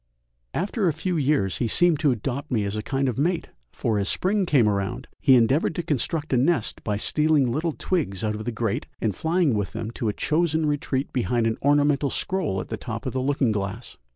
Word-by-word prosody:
After 200 +1 0
a 165 - +2
few 180 +4 -2
years 140 - +1
he 120 - +1
seemed 175 +4 +3
to 155 -2 +3
adopt 135 +4 -2
me 115 -5 +1
as 100 +1 -2
a 110 - -2
kind 135 +4 -1
of 125 -1 -2
mate! 170 +3 0 0.2
for 110 -5 -1
as 100 - 0
spring 195 0 +1
came 130 -9 +4
round 105 +5 -2
he 135 -3 +5
endeavoured 130 +7 +3
to 175 - -2
construct 155 0 -1
a - - +4
nest 135 -2 +1
by 105 -2 -1
stealing 150 +3 +2
little 160 +6 -1
twigs 140 - -2
out 105 -1 0
of 105 0 -6
the 120 - -1
grate 115 -2 -2
and 105 -4 -1
flying 160 - +1
with 105 -3 -2
them 110 0 -4
to 115 -2 -2
a - - -1
chosen 160 +2 +1
retreat 145 -2 -1
behind 120 -2 +1
an 115 0 -1
ornamental 145 0 +3
scroll 175 - -1
at - - -6
the - - -3
top - - -6
of - - -3
the 130 - -1
looking 135 -3 +1
glass. 105 +3 -4
135 Hz, 220 wpm, -24 LUFS, 110-155 Hz, 0.2 s, he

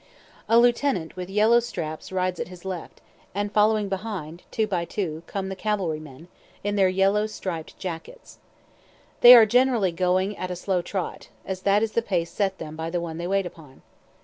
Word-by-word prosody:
A 230 - +6
lieutenant, 240 - +2
with 180 0 -6
yellow 215 +4 +4
straps, 170 -11 -6
rides 185 -1 -1
at - - -3
his 180 0 -13
left, 185 -3 -6 0.3
and 205 0 -2
following 210 0 +3
behind, 185 -5 -5
two 220 - 0
by 185 -5 -1
two, 170 -3 -4
come 195 -1 -4
the 190 - -5
cavalry 190 -6 -1
men, 155 +2 -12 0.4
in 205 +1 -1
their 195 -2 +4
yellow 195 +3 +2
striped 180 -6 -6
jackets. 185 - -8 0.8
They 245 +1 +11
are 230 -2 +9
generally 240 -4 +3
going 185 +3 0
at 185 - -4
a 180 - -3
slow 180 0 -1
trot, 185 +1 -5 0.2
as 190 -1 -4
that 200 +2 +3
is 225 - -1
the 230 - +1
pace 175 -6 -2
set 195 -2 -1
them 155 -1 -7
by 160 +1 -4
the 175 +1 -1
one 165 -1 -5
they 175 - -3
wait 195 0 +1
upon. 155 -6 -12
190 Hz, 190 wpm, -25 LUFS, 170-210 Hz, 0.8 s, They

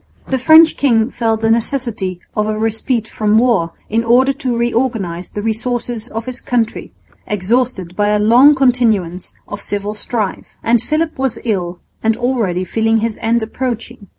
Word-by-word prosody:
The 265 - 0
French 315 +5 +6
king 235 -3 +2
felt 225 -2 -1
the 225 0 +2
necessity 225 -6 -1 0.2
of 210 0 0
a 215 0 -2
respite 225 +1 -1
from 215 -1 +1
war 220 -9 +2
in 225 +2 0
order 255 +4 +3
to 260 -4 -3
reorganise 230 -7 -1
the 205 - -6
resources 235 +1 -2
of 225 0 -6
his 255 -1 -4
country, 235 -2 -2 0.4
exhausted 210 -2 -1
by 205 +1 +1
a 210 - +2
long 245 +8 +6
continuance 225 -9 +1
of 205 0 -7
civil 205 +1 -3
strife; 215 -1 -4 0.2
and 235 -1 +3
Philip 310 -1 -2
was 265 -3 -1
ill 180 -6 -2 0.2
and 225 0 +1
already 230 -8 -1
feeling 225 +4 +1
his 225 0 -2
end 230 0 +1
approaching. 235 -2 -5
225 Hz, 160 wpm, -16 LUFS, 210-245 Hz, 0.4 s, French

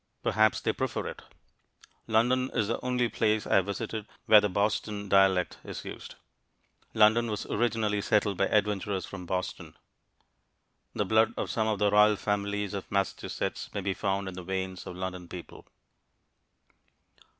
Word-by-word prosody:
Perhaps 110 -1 +3
they - - 0
prefer - - -2
it. - - -6 0.9
London 125 +4 +2
is 110 -4 +1
the 115 - -2
only 125 -1 +1
place 110 -2 0
I - - +3
have 95 0 +2
visited 105 +2 -4 0.2
where 105 -1 +8
the 105 - 0
Boston 100 +1 -1
dialect 95 -2 +3
is - - -7
used. - - -8 0.8
London 110 +2 +5
was 105 -2 -3
originally 110 -2 0
settled 105 -1 +1
by 100 +2 +1
adventurers 100 -3 0
from 90 -3 -8
Boston. 90 0 -4 1.2
The 105 - 0
blood 110 +3 +3
of - - -2
some 110 -1 0
of 110 -1 0
the 105 0 +2
royal 105 +1 +6
families 100 0 -2
of 100 - -6
Massachusetts 100 -2 -2
may 100 - -1
be 95 0 -1
found 95 0 -2
in 95 - -5
the 90 - -7
veins 95 0 -4
of 90 - -7
London 90 -1 -5
people. 85 0 -10
105 Hz, 155 wpm, -29 LUFS, 95-110 Hz, 1.2 s, where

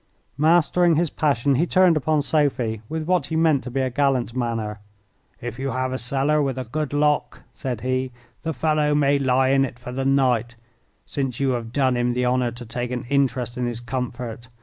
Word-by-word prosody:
Mastering 170 +2 +4
his 165 0 +1
passion, 140 -2 +1
he 155 +7 +2
turned 185 -2 +4
upon 155 0 +1
Sophie 130 -8 0
with 160 0 -3
what 175 -3 +1
he 160 - -3
meant 160 -4 +3
to - - -4
be 135 +2 -1
a 130 -1 -1
gallant 130 -3 0
manner. 115 -4 -2 0.6
"If 120 +1 -6
you 135 +1 -2
have 130 0 -2
a 130 - -2
cellar 140 +4 +1
with 135 -2 -1
a 130 - -2
good 150 +5 -3
lock," 150 0 0
said 125 -5 -4
he, 130 0 -1 0.3
"the 165 - -2
fellow 150 +1 +1
may 140 -1 +3
lie 130 -1 +2
in 135 0 +4
it 125 -2 -4
for 125 0 -8
the 135 +2 -2
night, 125 -4 +2 0.5
since 135 -4 -3
you 135 -1 +1
have 115 -2 -3
done 130 -1 +2
him 120 0 +1
the 125 +1 0
honour 125 0 +1
to 120 +1 -9
take 120 +2 -4
an 125 -2 -4
interest 130 -3 0
in 125 - 0
his 120 -1 -4
comfort. 120 -1 -5
130 Hz, 205 wpm, -23 LUFS, 120-145 Hz, 0.6 s, Mastering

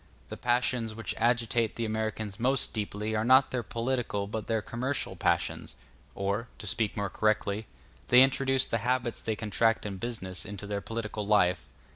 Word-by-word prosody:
The - - -5
passions 120 -2 0
which 115 - -3
agitate 115 -1 +2
the 115 - -2
Americans 110 -2 -3
most 130 +3 +1
deeply 105 0 -2
are 110 - +1
not 130 +3 +5
their 125 - -1
political 115 -4 -2
but 110 +2 -5
their 110 -2 0
commercial 130 +5 -2
passions; - - -1 0.4
or, 100 +4 -1
to - - -7
speak 110 -2 +1
more 100 -1 0
correctly, 110 -1 0 0.4
they 125 +1 +8
introduce 135 0 +2
the 115 - -1
habits 120 +1 -1
they 110 - -1
contract 115 +1 +1
in 100 -2 -4
business 95 -5 -5
into 100 +1 -7
their 100 0 -3
political 110 -1 -4
life. 90 -4 +3
110 Hz, 165 wpm, -29 LUFS, 105-120 Hz, 0.4 s, they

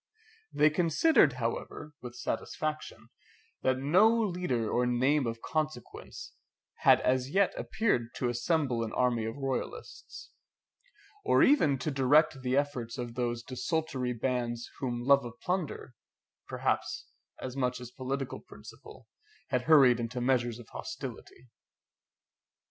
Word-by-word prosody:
They 150 +1 +4
considered, 165 - +4
however, 130 +5 -4
with 125 -1 -8
satisfaction, 155 +6 -4 0.5
that 130 0 +1
no 170 +11 +4
leader 180 - 0
or 125 +3 +1
name 130 +3 +2
of 115 0 -5
consequence 155 -6 -5 0.4
had - - +5
as 130 0 +1
yet 195 +5 +2
appeared 120 - -1
to 125 - -1
assemble 120 0 0
an 110 - -4
army 120 -3 +1
of 115 +4 -5
royalists, 135 -2 -5 0.9
or 410 - +4
even 160 - +4
to 150 +4 -3
direct 135 +1 +3
the 130 +1 0
efforts 140 -4 -2
of 120 -2 -5
those 120 -1 -2
desultory 130 -1 -2
bands, 120 -1 -2
whom 120 -3 -3
love 140 +1 +5
of 120 -1 -9
plunder, 180 -7 -3 0.5
perhaps, - - -2 0.3
as 130 0 -6
much 125 -2 -1
as 125 -1 -9
political 130 +1 -4
principle, 70 - -14 0.4
had 125 -2 0
hurried 135 -6 +6
into 120 +2 -3
measures 120 -2 +1
of 120 -2 -12
hostility. 390 +4 -8
130 Hz, 125 wpm, -30 LUFS, 120-150 Hz, 0.9 s, hurried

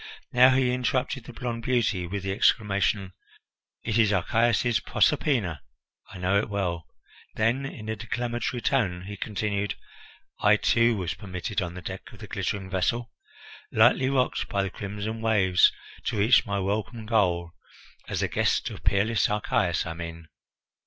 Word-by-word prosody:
Now 125 +1 +7
he 130 -1 +2
interrupted 125 0 -1
the 125 - -9
blond 120 -2 -4
beauty 115 -7 0
with 100 +1 -4
the 95 - -2
exclamation: 100 -2 +1 0.7
"It 110 +1 0
is 110 -2 +4
Archias's 115 +4 +2
Proserpina! 120 - +1 0.5
I 95 - -10
know 95 +3 +2
it 110 - -3
well." 90 -5 -2 0.5
Then, 120 +5 +1
in 110 -5 -9
a 110 - -2
declamatory 120 +2 -3
tone, 95 -10 +1
he 100 +2 -7
continued: 100 -1 -2 0.6
"I, 105 +1 +5
too, 115 +1 +3
was 90 -4 -2
permitted 100 +1 -4
on 90 -1 -4
the 90 - -8
deck - - -7
of - - -13
the - - -9
glittering 100 -2 -3
vessel, 105 +5 -1 0.6
lightly 130 0 +4
rocked 130 -2 0
by 100 -1 0
the 95 - -3
crimson 105 +2 -5
waves, 100 -5 +4 0.3
to - - -1
reach 110 +4 +4
my 100 0 -1
welcome 105 +3 -2
goal; 90 -7 +1 0.6
as - - -2
the - - +1
guest - - 0
of - - -10
peerless 105 +3 +2
Archias, 100 -4 0
I 80 - -4
mean. 85 -1 -8
105 Hz, 155 wpm, -26 LUFS, 95-120 Hz, 0.7 s, Now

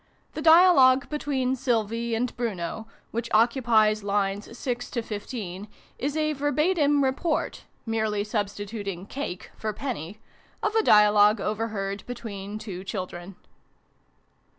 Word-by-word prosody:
The 310 - -5
dialogue 315 -6 +6
between 270 -4 -1
Sylvie 230 -2 -1
and 245 +2 -2
Bruno, 220 -2 -4 0.2
which 235 +1 -3
occupies 225 -2 +3
lines 205 +2 -2
6 245 -1 -3
to 235 - -3
15, 205 -3 -6 0.3
is 285 +4 -2
a 305 0 +1
verbatim 290 0 +2
report 275 +4 -1 0.2
(merely 220 -2 0
substituting 205 -2 -4
"cake" 210 -7 -6
for 220 - -3
"penny") 215 - -5 0.5
of - - +1
a 445 - +4
dia 210 - +6
logue 210 +1 +5
overheard 210 -2 -3
between 215 -4 -6
two 200 -4 -7
children. 185 -1 -6
225 Hz, 120 wpm, -26 LUFS, 205-260 Hz, 0.5 s, dialogue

